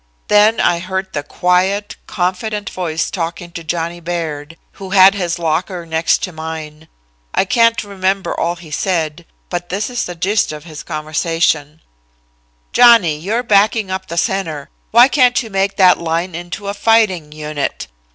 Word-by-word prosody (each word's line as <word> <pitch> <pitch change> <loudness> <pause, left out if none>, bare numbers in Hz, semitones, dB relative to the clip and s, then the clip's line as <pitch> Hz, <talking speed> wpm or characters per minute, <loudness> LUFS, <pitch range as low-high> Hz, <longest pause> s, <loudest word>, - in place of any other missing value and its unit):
Then 210 +2 +5
I 175 -1 +2
heard 190 +1 -4
the 145 - -2
quiet, 185 +7 0
confident 200 +3 -2
voice 165 -3 -2
talking 170 0 -4
to 170 -1 -7
Johnny 170 +1 -3
Baird, 165 -2 -5 0.2
who 190 - -6
had 190 0 +7
his 175 -3 -2
locker 170 +2 -2
next 160 0 +1
to 185 - -3
mine. 160 -1 -7 0.5
I - - +3
can't 230 +1 +3
remember 195 -1 -1
all 170 +1 -1
he 170 -3 -13
said, 165 -1 -2 0.2
but 175 0 -4
this 205 +6 -2
is 245 -2 -2
the 175 - -6
gist 195 +4 0
of 150 -1 -8
his 155 -3 -9
conversation: 155 -1 -1 0.9
"'Johnny, 235 -10 +6
you're 215 +9 -1
backing 210 -2 +2
up 190 0 -4
the 170 - -6
center. 170 -7 -2 0.2
Why 240 +3 +7
can't 255 -3 +3
you 225 - -10
make 195 0 0
that 185 -2 +5
line 170 +2 -2
into 175 +4 -6
a 200 - -2
fighting 205 -7 +2
unit? 150 -1 -4
180 Hz, 160 wpm, -17 LUFS, 165-200 Hz, 0.9 s, had